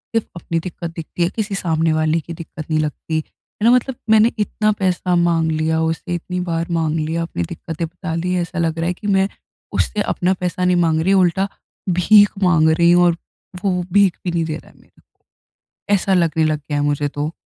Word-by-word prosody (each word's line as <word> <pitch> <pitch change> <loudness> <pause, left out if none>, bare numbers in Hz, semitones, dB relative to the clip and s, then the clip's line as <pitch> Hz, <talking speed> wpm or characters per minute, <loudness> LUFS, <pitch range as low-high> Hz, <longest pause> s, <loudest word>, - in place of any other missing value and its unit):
सिर्फ़ 225 - +1
अपनी 170 -1 -2
दिक्कत 170 0 -6
दिखती 165 +2 -3
है, 170 - +2
किसी 210 -2 -2
सामने 165 -3 +1
वाले 155 +1 +1
की 170 - -8
दिक्कत 160 -1 -9
नहीं 155 -1 +1
लगती। 155 +1 -2 0.5
है - - +5
न? 240 - +7
मतलब 250 +1 +1
मैंने 220 +2 +5
इतना 215 0 +1
पैसा 180 -1 +1
माँग 165 -1 +1
लिया 160 +1 0
उसे 165 +2 -2
इतनी 180 +1 -4
बार 165 0 -1
माँग 160 -1 0
लिया 160 +2 -1
अपनी 125 - -3
दिक्कतें 165 0 -5
बता 180 0 -6
ली 180 +2 -1
ऐसा 175 +1 -4
लग 165 -1 0
रहा 165 - 0
है 180 - 0
कि 205 +4 -8
मैं 190 0 +3 0.5
उससे 210 - 0
अपना 180 +1 +1
पैसा 180 0 -1
नहीं 180 0 +3
माँग 160 -1 +2
रही। 190 +4 +2
उल्टा 190 0 +3 0.5
भीख 205 +2 +5
माँग 165 -3 +4
रही 170 +2 +4
हूँ 175 0 +5
और 170 -1 +2 0.5
वो 180 -3 0
भीख 200 -3 +4
भी 175 - 0
नहीं 170 -1 0
दे 155 -1 -3
रहा - - -16
है - - -26
मेरे - - -25
को। - - -50 0.7
ऐसा 195 0 +2
लगने 165 -3 +2
लग 155 -1 0
गया 145 0 -4
है 145 - +1
मुझे 145 0 0
तो। 145 +2 -3
170 Hz, 215 wpm, -19 LUFS, 160-185 Hz, 0.7 s, न